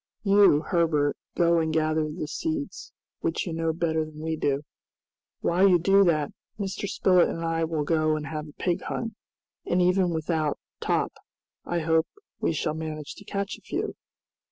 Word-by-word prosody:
"You, 200 -7 +6
Herbert, 160 -5 +2 0.2
go 170 -1 +4
and 160 -1 0
gather 155 -1 +1
the 155 -1 -4
seeds, 315 - -4 0.3
which 165 - -1
you 170 - -4
know 165 0 0
better 160 -1 0
than 155 -1 -10
we 160 +1 -2
do. 145 -2 0 0.8
While 185 +3 +4
you 180 - +6
do 195 +4 +5
that, 155 -4 +2 0.3
Mr. 200 0 -3
Spilett 180 -2 +4
and 165 0 -3
I 165 0 +1
will 160 -2 -1
go 155 0 +2
and 150 -1 -4
have 150 +2 -5
a 150 - -13
pig 180 +3 -1
hunt, 230 -1 -3 0.5
and 180 - +2
even 180 0 +3
without 160 -2 0 0.2
Top - - 0 0.5
I 175 -1 -1
hope 160 0 +2 0.3
we - - +1
shall 155 0 -1
manage 155 -2 -5
to 205 - -14
catch 200 0 -3
a - - -29
few!" - - -3
165 Hz, 175 wpm, -26 LUFS, 155-180 Hz, 0.8 s, You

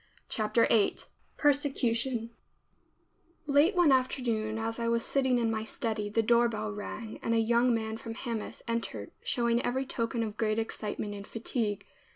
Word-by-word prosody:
CHAPTER 220 +1 +2
VIII 215 -3 +3 0.4
PERSECUTION 260 -5 +1 1.1
Late 295 +7 +4
one 350 -5 +5
afternoon 240 -4 +1
as 225 +1 -3
I 230 - -1
was 230 0 +1
sitting 260 -2 +2
in 230 -2 +1
my 220 -1 -2
study, 220 -2 -2
the 225 +2 +1
doorbell 230 -2 +2
rang 210 +2 -6
and 230 - 0
a - - +4
young 235 +2 +3
man 220 -1 -1
from 225 -2 -7
Hamath 230 -3 -5
entered, 230 - -3
showing 235 -1 +1
every 260 +2 0
token 230 -2 -1
of 215 -1 -5
great 215 -1 +1
excitement 215 -2 -3
and 200 0 -8
fatigue. 225 -2 -2
230 Hz, 155 wpm, -30 LUFS, 220-245 Hz, 1.1 s, one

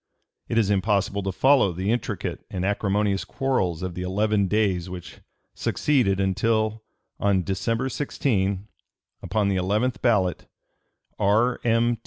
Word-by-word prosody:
It 115 - -1
is 105 -3 +3
impossible 100 0 +1
to 95 0 -2
follow 130 -1 +4
the 95 +5 -1
intricate 120 - -3
and 95 0 -3
acrimonious 100 0 0
quarrels 95 -11 -1
of 90 -1 -3
the 90 - -5
eleven 100 +2 +1
days 95 -4 0
which 90 -1 -9 0.3
succeeded 120 -10 +1
until 110 +3 +1 0.4
on 100 -2 +2
December 115 +7 -1
16, 100 -8 -1 0.5
upon 105 -2 0
the 95 - +1
eleventh 105 +7 0
ballot, 95 -8 +1 0.7
R. 110 +5 +2
M. 115 0 +2
100 Hz, 130 wpm, -24 LUFS, 95-115 Hz, 0.7 s, follow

